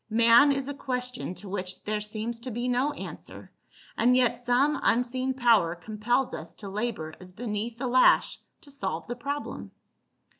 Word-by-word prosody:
Man 235 Hz, +5 st, +6 dB
is 275 Hz, -1 st, -1 dB
a 285 Hz, -, -3 dB
question 250 Hz, -7 st, -4 dB
to 205 Hz, -, -10 dB
which 185 Hz, -1 st, -5 dB
their 210 Hz, 0 st, -2 dB
seems 220 Hz, +2 st, -4 dB
to 250 Hz, +2 st, -6 dB
be 240 Hz, +1 st, -3 dB
no 250 Hz, +4 st, +1 dB
answer, -, -, -9 dB, 0.4 s
and 250 Hz, +2 st, +4 dB
yet 250 Hz, -2 st, +4 dB
some 245 Hz, +5 st, +1 dB
unseen 255 Hz, +2 st, +1 dB
power 230 Hz, -10 st, +4 dB
compels 220 Hz, +7 st, -1 dB
us 165 Hz, +2 st, -7 dB
to 200 Hz, -, -8 dB
labor 200 Hz, -6 st, -3 dB
as 185 Hz, 0 st, -11 dB
beneath 220 Hz, +2 st, -4 dB
the 255 Hz, -, -4 dB
lash 255 Hz, +1 st, +4 dB, 0.2 s
to 290 Hz, -4 st, -14 dB
solve 190 Hz, -, -4 dB
the 240 Hz, -, -5 dB
problem." 280 Hz, +4 st, -5 dB
240 Hz, 165 wpm, -27 LUFS, 210-255 Hz, 0.4 s, Man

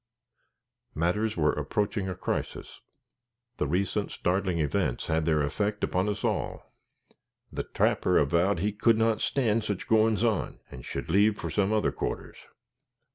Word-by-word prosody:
Matters 105 Hz, +7 st, 0 dB
were 75 Hz, -2 st, +3 dB
approaching 100 Hz, +6 st, -1 dB
a 90 Hz, -, -3 dB
crisis. -, -, -4 dB, 0.8 s
The 75 Hz, -, 0 dB
recent 95 Hz, +5 st, 0 dB
startling 90 Hz, -1 st, 0 dB
events 75 Hz, -4 st, 0 dB
had 80 Hz, 0 st, 0 dB
their 75 Hz, -2 st, +2 dB
effect 105 Hz, +8 st, -2 dB
upon 95 Hz, +3 st, +1 dB
us 105 Hz, -, -3 dB
all. -, -, -2 dB, 0.8 s
The -, -, -3 dB
trapper 90 Hz, -, +2 dB
avowed 85 Hz, +7 st, +2 dB
he 105 Hz, +2 st, +1 dB
could 110 Hz, +2 st, +3 dB
not 115 Hz, -1 st, +2 dB
stand 115 Hz, -5 st, +1 dB
"sich 105 Hz, -3 st, -3 dB
goin's 110 Hz, 0 st, +3 dB
on," 110 Hz, -5 st, 0 dB
and 60 Hz, -, -9 dB
should -, -, -5 dB
leave 105 Hz, +3 st, +4 dB
for -, -, -5 dB
some 100 Hz, 0 st, +1 dB
other 110 Hz, -1 st, +2 dB
quarters. -, -, -5 dB
100 Hz, 145 wpm, -28 LUFS, 85-105 Hz, 0.8 s, leave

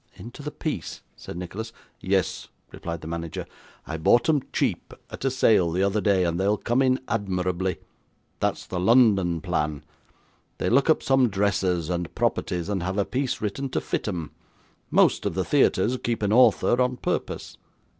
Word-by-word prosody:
'Into 120 Hz, +5 st, -10 dB
the 150 Hz, -, -4 dB
piece?' 150 Hz, -, -5 dB
said -, -, -9 dB
Nicholas. 100 Hz, +6 st, -6 dB, 0.3 s
'Yes,' -, -, -1 dB, 0.2 s
replied 85 Hz, -2 st, -6 dB
the 80 Hz, -, -8 dB
manager. 85 Hz, 0 st, -5 dB, 0.4 s
'I 80 Hz, -, -4 dB
bought 120 Hz, +9 st, +3 dB
'em 150 Hz, -3 st, +3 dB
cheap, -, -, -1 dB, 0.2 s
at -, -, -8 dB
a -, -, +4 dB
sale 110 Hz, -9 st, +3 dB
the 90 Hz, +4 st, 0 dB
other 100 Hz, +2 st, +1 dB
day, 100 Hz, -3 st, +3 dB
and 85 Hz, 0 st, -1 dB
they'll 100 Hz, +2 st, +2 dB
come 120 Hz, +5 st, 0 dB
in 130 Hz, -1 st, +3 dB
admirably. 95 Hz, -4 st, -1 dB, 0.6 s
That's -, -, -1 dB
the 90 Hz, -, -4 dB
London 95 Hz, -5 st, +4 dB
plan. 75 Hz, 0 st, -2 dB, 0.7 s
They -, -, -1 dB
look 135 Hz, +5 st, +3 dB
up 160 Hz, -, +3 dB
some 135 Hz, -2 st, +3 dB
dresses, 95 Hz, -4 st, 0 dB
and 85 Hz, -2 st, -3 dB
properties, 90 Hz, -2 st, -1 dB
and 100 Hz, -3 st, -1 dB
have 95 Hz, +3 st, -3 dB
a 100 Hz, -, +2 dB
piece 130 Hz, 0 st, -2 dB
written 120 Hz, +6 st, -3 dB
to -, -, -1 dB
fit -, -, -3 dB
'em. 85 Hz, -6 st, -4 dB, 0.6 s
Most -, -, +3 dB
of -, -, -3 dB
the -, -, 0 dB
theatres 125 Hz, +3 st, +2 dB
keep 115 Hz, -2 st, -1 dB
an 105 Hz, +1 st, +1 dB
author 125 Hz, +1 st, +4 dB
on 125 Hz, 0 st, +1 dB
purpose. -, -, -3 dB
100 Hz, 175 wpm, -25 LUFS, 90-120 Hz, 0.7 s, a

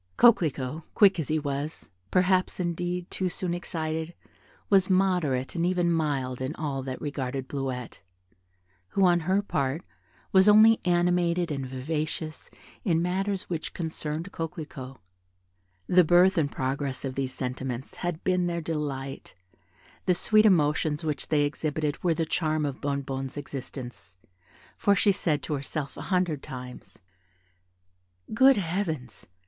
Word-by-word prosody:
Coquelicot, 155 Hz, -, +3 dB
quick 195 Hz, -4 st, +6 dB
as 160 Hz, -, -2 dB
he 155 Hz, -, +1 dB
was, 145 Hz, -1 st, -4 dB, 0.2 s
perhaps, 185 Hz, 0 st, +2 dB
indeed, 175 Hz, 0 st, -2 dB
too 185 Hz, -1 st, -1 dB
soon 175 Hz, 0 st, -3 dB
excited, 160 Hz, -1 st, -3 dB, 0.5 s
was 195 Hz, -2 st, +4 dB
moderate 180 Hz, -9 st, +1 dB
and 170 Hz, -, -1 dB
even 175 Hz, -1 st, +2 dB
mild 140 Hz, -6 st, -1 dB
in 130 Hz, +5 st, -3 dB
all 140 Hz, -3 st, -3 dB
that 130 Hz, -1 st, -5 dB
regarded 135 Hz, -2 st, -3 dB
Bleuette, 130 Hz, -3 st, -4 dB, 0.9 s
who 195 Hz, -, +3 dB
on 175 Hz, -1 st, +5 dB
her 190 Hz, +5 st, +1 dB
part, 140 Hz, -2 st, -1 dB, 0.5 s
was 190 Hz, +1 st, +6 dB
only 220 Hz, +2 st, +7 dB
animated 175 Hz, -1 st, +2 dB
and 135 Hz, -2 st, -3 dB
vivacious 155 Hz, +4 st, -4 dB, 0.3 s
in 170 Hz, -6 st, +2 dB
matters 190 Hz, +3 st, -1 dB
which 165 Hz, -3 st, -5 dB
concerned 160 Hz, +1 st, -4 dB
Coquelicot. 155 Hz, -5 st, -6 dB, 0.9 s
The 180 Hz, -, +5 dB
birth 175 Hz, +3 st, +5 dB
and 150 Hz, -5 st, +1 dB
progress 135 Hz, +1 st, -2 dB
of 130 Hz, -, -3 dB
these 135 Hz, -1 st, -2 dB
sentiments 130 Hz, 0 st, -4 dB
had 175 Hz, -2 st, -3 dB
been 180 Hz, -1 st, +2 dB
their 170 Hz, -1 st, -1 dB
delight; 145 Hz, -4 st, -4 dB, 0.7 s
the 180 Hz, -, +4 dB
sweet 215 Hz, +4 st, +5 dB
emotions 155 Hz, -3 st, +2 dB
which 150 Hz, -2 st, -2 dB
they 150 Hz, -2 st, +3 dB
exhibited 150 Hz, +1 st, -2 dB
were 170 Hz, -2 st, +2 dB
the 165 Hz, -, 0 dB
charm 155 Hz, -1 st, 0 dB
of 140 Hz, -2 st, -4 dB
Bonnebonne's 135 Hz, -1 st, -3 dB
existence, 125 Hz, -9 st, -8 dB, 0.6 s
for 200 Hz, -, +4 dB
she 200 Hz, +1 st, +4 dB
said 165 Hz, -6 st, 0 dB
to 155 Hz, -, -3 dB
herself 140 Hz, +1 st, -4 dB
a -, -, -7 dB
hundred 180 Hz, -6 st, +1 dB
times, 125 Hz, -7 st, -9 dB, 1.4 s
"Good 265 Hz, +2 st, +6 dB
Heavens! 165 Hz, -, -3 dB
155 Hz, 135 wpm, -27 LUFS, 135-180 Hz, 1.4 s, only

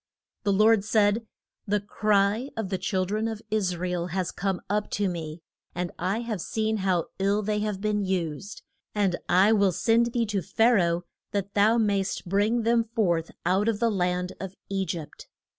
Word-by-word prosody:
The 205 Hz, -, +1 dB
Lord 215 Hz, +1 st, +4 dB
said, 215 Hz, +1 st, +2 dB, 0.4 s
The 205 Hz, +1 st, +2 dB
cry 205 Hz, +4 st, +1 dB
of 220 Hz, -4 st, -2 dB
the 190 Hz, -2 st, -2 dB
chil 190 Hz, -4 st, 0 dB
dren 215 Hz, +4 st, -1 dB
of 220 Hz, -2 st, -4 dB
Is 190 Hz, -5 st, 0 dB
ra 180 Hz, +2 st, -2 dB
el 175 Hz, -1 st, -2 dB
has 180 Hz, 0 st, -2 dB
come 190 Hz, -1 st, -2 dB
up 210 Hz, +1 st, -1 dB
to 205 Hz, -1 st, +1 dB
me, 165 Hz, -2 st, -5 dB, 0.3 s
and 175 Hz, 0 st, -2 dB
I 190 Hz, +6 st, 0 dB
have 220 Hz, -6 st, -3 dB
seen 220 Hz, +3 st, -1 dB
how 185 Hz, -4 st, 0 dB
ill 200 Hz, +2 st, +1 dB
they 210 Hz, +1 st, 0 dB
have 210 Hz, -2 st, -2 dB
been 210 Hz, -1 st, 0 dB
used. 185 Hz, 0 st, -3 dB, 0.3 s
And 200 Hz, -4 st, +2 dB
I 190 Hz, +4 st, +5 dB
will 200 Hz, -3 st, +4 dB
send 230 Hz, +6 st, +2 dB
thee 235 Hz, -1 st, +1 dB
to 205 Hz, -2 st, -1 dB
Pha 225 Hz, +8 st, +3 dB
ra 200 Hz, -6 st, +4 dB
oh 170 Hz, +1 st, -2 dB, 0.3 s
that 200 Hz, -1 st, -2 dB
thou 215 Hz, +3 st, +4 dB
mayst 200 Hz, -4 st, 0 dB
bring 210 Hz, +5 st, +2 dB
them 230 Hz, 0 st, +3 dB
forth 170 Hz, -7 st, +1 dB, 0.2 s
out 190 Hz, +4 st, +2 dB
of 215 Hz, -2 st, -1 dB
the 230 Hz, -1 st, +2 dB
land 180 Hz, -1 st, -1 dB
of 190 Hz, 0 st, -6 dB
E 195 Hz, -1 st, -1 dB
gypt. 165 Hz, -4 st, -6 dB
200 Hz, 195 wpm, -26 LUFS, 185-215 Hz, 0.4 s, I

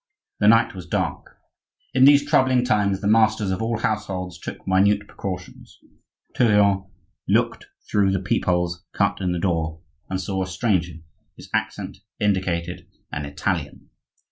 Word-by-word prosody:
The 105 Hz, -, +3 dB
night 115 Hz, +1 st, +5 dB
was 90 Hz, -2 st, -9 dB
dark. -, -, -3 dB, 0.6 s
In 130 Hz, 0 st, +6 dB
these 145 Hz, 0 st, +6 dB
troublous 130 Hz, -4 st, +3 dB
times 100 Hz, -5 st, +1 dB
the 100 Hz, -, -1 dB
masters 110 Hz, -2 st, +3 dB
of 95 Hz, -, -2 dB
all 115 Hz, 0 st, -1 dB
households 95 Hz, -6 st, -3 dB
took -, -, -8 dB
minute 100 Hz, +2 st, +3 dB
precautions. 90 Hz, -2 st, -7 dB, 0.6 s
Tourillon 100 Hz, -4 st, +3 dB, 0.4 s
looked -, -, +1 dB, 0.2 s
through 100 Hz, -2 st, +2 dB
the 95 Hz, -, 0 dB
peep 95 Hz, +2 st, -1 dB
holes 90 Hz, -1 st, 0 dB
cut 100 Hz, -1 st, 0 dB
in 90 Hz, -1 st, 0 dB
the 90 Hz, -, -1 dB
door, 80 Hz, -3 st, -1 dB, 0.3 s
and 95 Hz, -, -2 dB
saw 95 Hz, +1 st, -2 dB
a 95 Hz, -, -2 dB
stranger, 90 Hz, -3 st, 0 dB, 0.4 s
whose -, -, -13 dB
accent -, -, -3 dB, 0.2 s
indicated 90 Hz, -4 st, -1 dB, 0.2 s
an 75 Hz, 0 st, -4 dB
Italian. 70 Hz, -, -3 dB
95 Hz, 145 wpm, -23 LUFS, 90-105 Hz, 0.6 s, In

